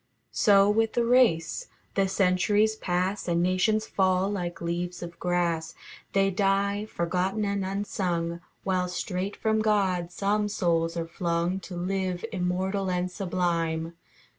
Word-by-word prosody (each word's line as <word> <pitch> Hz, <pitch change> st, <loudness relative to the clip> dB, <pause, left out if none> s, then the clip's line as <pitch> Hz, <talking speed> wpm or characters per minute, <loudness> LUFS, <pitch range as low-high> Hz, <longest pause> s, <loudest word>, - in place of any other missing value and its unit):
So 200 Hz, -1 st, +5 dB
with 220 Hz, +1 st, +2 dB
the 240 Hz, -, +1 dB
race. 230 Hz, -10 st, +3 dB, 0.3 s
The 195 Hz, -1 st, +2 dB
centuries 195 Hz, +3 st, +2 dB
pass 185 Hz, 0 st, -1 dB
And 170 Hz, 0 st, +2 dB
nations 185 Hz, +4 st, +2 dB
fall 190 Hz, 0 st, +1 dB
like 175 Hz, -4 st, -3 dB
leaves 175 Hz, +1 st, -3 dB
of 170 Hz, 0 st, -9 dB
grass. 170 Hz, -2 st, 0 dB, 0.4 s
They 195 Hz, 0 st, +3 dB
die, 200 Hz, +2 st, +1 dB
forgotten 185 Hz, +4 st, -1 dB
and 200 Hz, -1 st, -1 dB
unsung; 180 Hz, -3 st, -2 dB, 0.2 s
While 185 Hz, -1 st, 0 dB
straight 185 Hz, +2 st, -3 dB
from 220 Hz, -1 st, +1 dB
God 190 Hz, -5 st, +1 dB
some 205 Hz, +3 st, 0 dB
souls 165 Hz, -3 st, 0 dB
are 165 Hz, 0 st, -2 dB
flung, 170 Hz, +2 st, -1 dB
To 185 Hz, -1 st, -9 dB
live 185 Hz, +1 st, -2 dB
immortal 190 Hz, +1 st, -1 dB
and 180 Hz, 0 st, -1 dB
sublime. 170 Hz, -3 st, -1 dB
185 Hz, 135 wpm, -27 LUFS, 175-200 Hz, 0.4 s, So